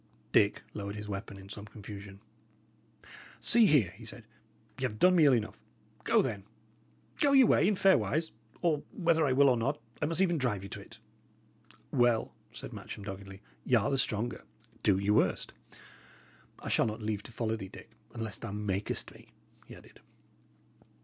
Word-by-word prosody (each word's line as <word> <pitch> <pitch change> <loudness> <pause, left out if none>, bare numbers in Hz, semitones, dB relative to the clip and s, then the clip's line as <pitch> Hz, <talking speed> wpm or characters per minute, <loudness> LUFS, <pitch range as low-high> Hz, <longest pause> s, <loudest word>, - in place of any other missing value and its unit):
Dick 100 0 +3
lowered 100 -1 -5
his 105 0 -7
weapon 100 0 -6
in 95 0 -12
some 105 0 -8
confusion. 100 -2 -10 1.2
"See 230 -2 +5
here," 130 - +4
he - - -14
said. - - -9 0.5
"Y' - - -8
have 120 -5 -2
done 180 +9 +5
me 165 -3 +6
ill 140 - +6
enough. 110 -3 -1 0.4
Go, - - +4
then. 100 -2 -3 0.8
Go 285 -1 +4
your 265 -2 +8
way 190 - +4
in 210 - +3
fair 190 0 +5
wise; 160 +2 -1 0.3
or, 155 -4 +2
whether 165 -4 +2
I - - +1
will 140 +2 +5
or 125 -2 +4
not, 135 +6 -1 0.2
I 150 - +1
must 165 +2 -1
even 175 -4 +2
drive 110 -7 0
you 100 - -8
to - - -6
it." - - -13 0.9
"Well," 120 -3 +2 0.2
said - - -9
Matcham, 100 - -8
doggedly, 95 0 -8 0.2
"y' 125 - +3
are 120 +4 +2
the 135 - +1
stronger. 115 0 -1 0.4
Do 100 -3 +3
your 100 +2 +1
worst. 110 - +1 1.0
I - - -10
shall - - +2
not 110 +1 -5
leave 105 -2 -2
to 120 - -11
follow 110 -1 -1
thee, 95 -4 -7
Dick, - - -13 0.2
unless 115 -2 -4
thou 110 - -6
makest 105 -1 -3
me," - - -17 0.4
he - - -10
added. - - -17
110 Hz, 180 wpm, -31 LUFS, 100-145 Hz, 1.2 s, your